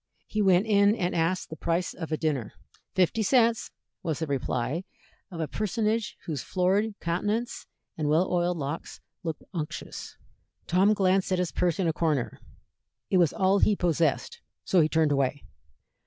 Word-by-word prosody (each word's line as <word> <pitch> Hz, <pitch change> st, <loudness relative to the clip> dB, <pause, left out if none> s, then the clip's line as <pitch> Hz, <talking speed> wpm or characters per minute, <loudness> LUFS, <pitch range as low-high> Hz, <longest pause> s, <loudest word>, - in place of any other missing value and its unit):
He 215 Hz, -, -2 dB
went 190 Hz, 0 st, +4 dB
in 205 Hz, -1 st, +4 dB
and 180 Hz, -5 st, -1 dB
asked 170 Hz, +2 st, 0 dB
the -, -, -4 dB
price 170 Hz, +2 st, -1 dB
of 165 Hz, -3 st, -7 dB
a 155 Hz, -, +1 dB
dinner. 145 Hz, -9 st, -1 dB, 0.4 s
"Fifty 185 Hz, +4 st, +2 dB
cents," 230 Hz, +1 st, +3 dB, 0.3 s
was 160 Hz, -4 st, -2 dB
the 160 Hz, -, -2 dB
reply 140 Hz, +2 st, -2 dB, 0.5 s
of 175 Hz, -4 st, -8 dB
a 160 Hz, -, -1 dB
personage 215 Hz, +3 st, -1 dB
whose 150 Hz, -6 st, -3 dB
florid 200 Hz, +4 st, +1 dB
countenance 210 Hz, +8 st, -2 dB, 0.3 s
and 150 Hz, -1 st, 0 dB
well 160 Hz, +5 st, +3 dB
oiled 175 Hz, 0 st, +1 dB
locks 145 Hz, +2 st, -5 dB, 0.2 s
looked 160 Hz, -4 st, -4 dB
unctuous. 155 Hz, -4 st, -6 dB, 0.5 s
Tom 195 Hz, +4 st, +3 dB
glanced 190 Hz, -1 st, +2 dB
at 185 Hz, -, +2 dB
his 180 Hz, -1 st, -1 dB
purse 175 Hz, -2 st, 0 dB
in 190 Hz, -3 st, +1 dB
a 160 Hz, -, +1 dB
corner. 155 Hz, -6 st, -1 dB, 0.7 s
It 185 Hz, -, +4 dB
was 170 Hz, -4 st, +4 dB
all 195 Hz, +1 st, +2 dB
he 210 Hz, -, +4 dB
possessed, 170 Hz, -, 0 dB, 0.2 s
so 185 Hz, -, +4 dB
he 155 Hz, -, +3 dB
turned 160 Hz, -2 st, +2 dB
away. 140 Hz, 0 st, 0 dB
175 Hz, 165 wpm, -27 LUFS, 160-200 Hz, 0.7 s, went